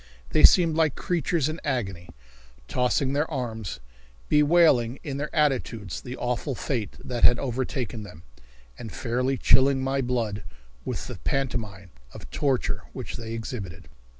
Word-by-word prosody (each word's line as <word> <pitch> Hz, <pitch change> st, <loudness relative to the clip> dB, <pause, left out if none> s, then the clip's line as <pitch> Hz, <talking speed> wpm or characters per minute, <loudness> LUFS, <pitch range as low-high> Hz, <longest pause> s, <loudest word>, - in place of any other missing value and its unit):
They -, -, +3 dB
seemed 165 Hz, -3 st, +7 dB
like 160 Hz, -4 st, +2 dB
creatures 170 Hz, -3 st, 0 dB
in 155 Hz, +1 st, -4 dB
agony, 95 Hz, -, -2 dB, 0.6 s
tossing 130 Hz, +2 st, +1 dB
their 150 Hz, +3 st, 0 dB
arms, 115 Hz, -, -4 dB, 0.5 s
bewailing 150 Hz, -6 st, +4 dB
in 140 Hz, -3 st, -4 dB
their 150 Hz, +2 st, -3 dB
attitudes 125 Hz, -, 0 dB
the 125 Hz, +1 st, -7 dB
awful 125 Hz, +3 st, -2 dB
fate 115 Hz, -7 st, -3 dB
that 120 Hz, -2 st, -3 dB
had 120 Hz, -, +7 dB
overtaken 125 Hz, -3 st, -3 dB
them, 85 Hz, -6 st, -11 dB, 0.6 s
and 110 Hz, -, -7 dB
fairly 125 Hz, +2 st, -1 dB
chilling 135 Hz, +1 st, +4 dB
my 135 Hz, +1 st, 0 dB
blood 115 Hz, -5 st, -1 dB, 0.4 s
with -, -, -3 dB
the -, -, -7 dB
pantomime 105 Hz, -9 st, -2 dB, 0.2 s
of -, -, -9 dB
torture 135 Hz, -4 st, 0 dB
which -, -, -6 dB
they 115 Hz, -1 st, -6 dB
exhibited. 105 Hz, -, -6 dB
125 Hz, 140 wpm, -26 LUFS, 115-140 Hz, 0.6 s, seemed